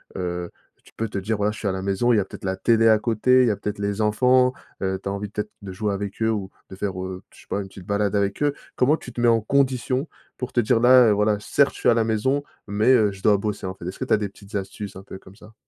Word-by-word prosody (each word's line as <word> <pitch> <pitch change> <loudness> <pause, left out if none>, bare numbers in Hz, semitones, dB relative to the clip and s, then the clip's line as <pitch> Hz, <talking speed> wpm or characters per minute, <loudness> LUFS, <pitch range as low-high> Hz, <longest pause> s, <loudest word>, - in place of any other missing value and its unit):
heu, 90 -1 -4 0.3
que - - -35
tu - - -29
peux 115 - -2
te - - -5
dire, 105 +2 -2
voilà: 105 +1 +1
«Je 105 - -9
suis 105 - -3
à 95 - +1
la 95 - -3
maison», 100 +5 +1
il - - +4
y - - +4
a 95 - -1
peut-être - - -12
la 95 - -1
télé 115 +2 +3
à 110 -1 +6
côté, 120 +3 +3
il 125 - +3
y - - +3
a - - -1
peut-être 105 +1 -5
les 100 +1 -2
enfants, 125 +4 +4 0.3
heu, 95 0 -1
tu - - -7
as - - -2
envie 100 +1 -4
peut-être 105 +1 -5
de 95 -2 -7
jouer 105 +2 -2
avec 100 +2 -5
eux 110 - +2
ou 100 -3 -3 0.2
de - - -7
faire, 95 -1 -3
heu, 95 0 -6
je - - -17
sais - - -21
pas 100 - -2
une 95 - -7
petite 95 -2 -13
balade 100 0 0
avec 100 +3 0
eux? 145 -1 +2 0.2
Comment 145 +5 +3
tu 125 - -10
te 120 - -4
mets 120 - +4
en 115 -1 +4
conditions 130 +3 0 0.3
pour 125 0 -5
te 120 - +2
dire: 115 +1 +2
«Là, 125 -1 +7
heu, - - +4
voilà, 105 0 +2
certes 140 +6 +2
je - - -10
suis - - +4
à - - +6
la 115 -1 +2
maison 115 +6 0 0.3
mais 105 +4 +1
heu, 105 -5 +4
je 95 -1 -12
dois 105 -2 +5
bosser», 105 -1 -4
en 95 - -4
fait? 85 - -11
Est-ce 95 - -7
que - - -2
tu - - +1
as - - +5
des 105 -1 -2
petites 100 +2 -13
astuces 100 +1 -5
un 95 - -9
peu 95 - -9
comme 95 - -16
ça? 110 +2 -16
105 Hz, 320 wpm, -23 LUFS, 100-115 Hz, 0.3 s, Là